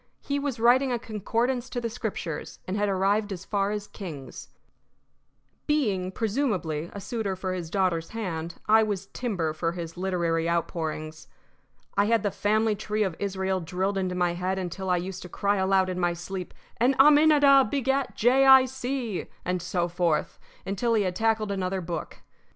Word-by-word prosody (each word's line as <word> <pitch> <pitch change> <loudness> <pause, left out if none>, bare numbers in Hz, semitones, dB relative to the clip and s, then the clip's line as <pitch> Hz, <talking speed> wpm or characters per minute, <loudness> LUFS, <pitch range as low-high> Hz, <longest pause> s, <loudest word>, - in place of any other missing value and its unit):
He 280 0 -2
was 280 -4 -3
writing 250 +3 +4
a 240 - +1
concordance 235 +3 -2
to 245 - -3
the 235 - -2
Scriptures, 215 -8 -5
and 185 - -2
had 205 0 +1
arrived 200 +2 +1
as 190 -1 -6
far 200 -1 0
as 210 -1 -3
Kings. 160 -11 -9 1.2
Being, 205 -12 +1
presumably, 195 - -1
a 200 - -7
suitor 205 -2 -3
for 185 0 -3
his 175 -3 -5
daughter's 180 -3 0
hand, 170 -7 -4
I 220 +1 +6
was 205 -3 -1
timber 185 -11 -2
for 165 +2 -2
his 170 -2 -7
literary 170 -3 0
outpourings. 160 -2 -3 0.7
I 200 - +3
had 225 0 +2
the 205 - 0
family 215 +2 +1
tree 215 +1 -1
of 190 -5 -2
Israel 190 -1 -1
drilled 185 +4 -2
into 185 -2 -1
my 175 -1 +1
head 185 +2 -2
until 190 +1 -4
I 180 - +3
used 185 +1 -5
to 180 - -9
cry 200 +4 0
aloud 190 0 +3
in 180 -1 -3
my 175 -1 +1
sleep: 180 +1 -6 0.2
"And 250 +4 +3
Aminadab 290 -3 +6
begat 270 0 0
Jay 260 +4 +4
Eye 265 -1 +9
See," 255 -5 -3 0.2
and 180 0 -1
so 175 0 -1
forth, 175 -2 0 0.3
until 225 +4 0
he 210 - +3
had 180 -2 -2
tackled 220 -1 +1
another 190 -1 -1
book. 170 -1 -6
195 Hz, 175 wpm, -27 LUFS, 180-225 Hz, 1.2 s, Eye